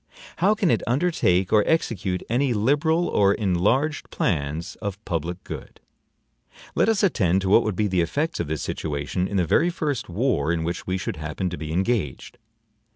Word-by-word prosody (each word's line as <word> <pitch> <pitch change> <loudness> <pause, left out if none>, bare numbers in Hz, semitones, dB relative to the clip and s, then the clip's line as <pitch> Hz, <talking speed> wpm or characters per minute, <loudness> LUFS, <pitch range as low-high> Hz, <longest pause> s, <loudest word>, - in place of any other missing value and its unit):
How 200 +5 +3
can 200 - +2
it 115 - +2
undertake 120 - +1
or 105 -1 +6
execute 95 - 0
any 125 +1 +1
liberal 150 +10 +2
or 100 -1 +3
enlarged 110 - 0
plans 75 +4 -2
of 100 -3 -3
public 85 +1 -3
good? - - -8 0.9
Let - - +2
us 220 -2 +2
attend 95 - +2
to 95 - -1
what 110 - +6
would 110 -4 -2
be 105 - +1
the 90 -3 +1
effects 145 - -1
of 85 - -2
this 75 -1 -3
situation 75 +4 -2
in 100 - -2
the 90 - +2
very 170 - +3
first 150 - -3
war 90 - 0
in 85 -1 -1
which 85 +2 -4
we 95 0 0
should 90 - -4
happen 80 +4 -3
to - - -3
be 80 -1 -5
engaged. 95 - -2
100 Hz, 180 wpm, -24 LUFS, 85-135 Hz, 0.9 s, or